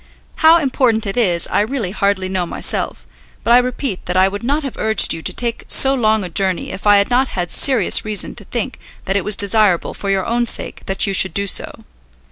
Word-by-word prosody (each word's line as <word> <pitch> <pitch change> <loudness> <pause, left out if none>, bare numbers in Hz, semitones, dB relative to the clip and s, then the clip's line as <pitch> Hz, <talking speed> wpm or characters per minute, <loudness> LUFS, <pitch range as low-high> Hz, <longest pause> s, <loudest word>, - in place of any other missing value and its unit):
How 320 +1 +5
important 255 -7 0
it 195 - -4
is 180 -8 +1
I - - +1
really 220 -4 -3
hardly 200 -2 -1
know 185 -2 -3
myself, - - -2 0.4
but 235 - +2
I 245 - +7
repeat 250 -4 -4
that 180 +1 -1
I 190 +1 +4
would 205 +2 -6
not 285 +6 -2
have 275 - -6
urged 220 0 +3
you 165 - -7
to - - -1
take 235 -1 -4
so 270 0 +5
long 220 -5 +1
a 180 - -6
journey 185 +1 -2
if 195 - -6
I 205 0 +6
had 200 +4 0
not 260 +2 +2
had 175 -6 -5
serious 255 -9 +2
reason 215 -1 0
to - - -3
think - - -4 0.3
that 195 - -2
it 200 - 0
was 210 - +1
desirable 200 -3 +2
for 200 - -6
your 195 -1 0
own 240 0 -1
sake - - -1
that 195 0 0
you 200 - -2
should 190 0 +1
do 200 - +1
so. 195 - -1
205 Hz, 230 wpm, -17 LUFS, 190-240 Hz, 0.4 s, I